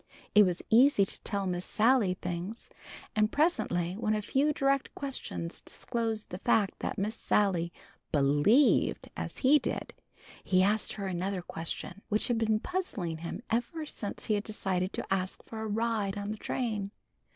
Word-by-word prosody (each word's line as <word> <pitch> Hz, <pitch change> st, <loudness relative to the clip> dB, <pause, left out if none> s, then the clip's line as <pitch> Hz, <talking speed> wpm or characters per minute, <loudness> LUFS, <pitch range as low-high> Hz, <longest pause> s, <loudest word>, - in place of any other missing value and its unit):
It 210 Hz, -2 st, +7 dB
was 180 Hz, -1 st, -2 dB
easy 235 Hz, -3 st, +6 dB
to -, -, -2 dB
tell 200 Hz, -2 st, -1 dB
Miss 180 Hz, -1 st, -1 dB
Sally 220 Hz, -4 st, +3 dB
things, 180 Hz, +6 st, -5 dB, 0.4 s
and 215 Hz, 0 st, +3 dB
presently 180 Hz, -, +1 dB
when 215 Hz, 0 st, 0 dB
a 210 Hz, -, -1 dB
few 280 Hz, +7 st, +2 dB
direct 275 Hz, -1 st, 0 dB
questions 255 Hz, -11 st, -4 dB
disclosed 225 Hz, -3 st, -3 dB
the 180 Hz, -, -5 dB
fact 200 Hz, -1 st, +2 dB
that -, -, -3 dB
Miss 205 Hz, +3 st, -1 dB
Sally 190 Hz, -7 st, +1 dB, 0.4 s
"bleeved" 150 Hz, -, +3 dB
as -, -, -5 dB
he 295 Hz, +3 st, +7 dB
did, -, -, -4 dB, 0.5 s
he 185 Hz, -1 st, +3 dB
asked 210 Hz, +2 st, +1 dB
her 200 Hz, -, -5 dB
another 185 Hz, 0 st, -2 dB
question, 170 Hz, +3 st, -5 dB
which 215 Hz, +2 st, 0 dB
had 235 Hz, -2 st, +2 dB
been 220 Hz, -1 st, +2 dB
puzzling 215 Hz, -, -3 dB
him 170 Hz, +8 st, -6 dB
ever 245 Hz, +8 st, -1 dB
since 205 Hz, -8 st, -5 dB
he 215 Hz, -, +1 dB
had 205 Hz, 0 st, 0 dB
decided 190 Hz, -3 st, -1 dB
to -, -, -2 dB
ask 185 Hz, -1 st, -2 dB
for 220 Hz, -1 st, -7 dB
a 220 Hz, -, -3 dB
ride 215 Hz, -2 st, 0 dB
on 205 Hz, +1 st, -3 dB
the 215 Hz, -, -4 dB
train. 215 Hz, -4 st, -2 dB
210 Hz, 165 wpm, -30 LUFS, 185-230 Hz, 0.5 s, It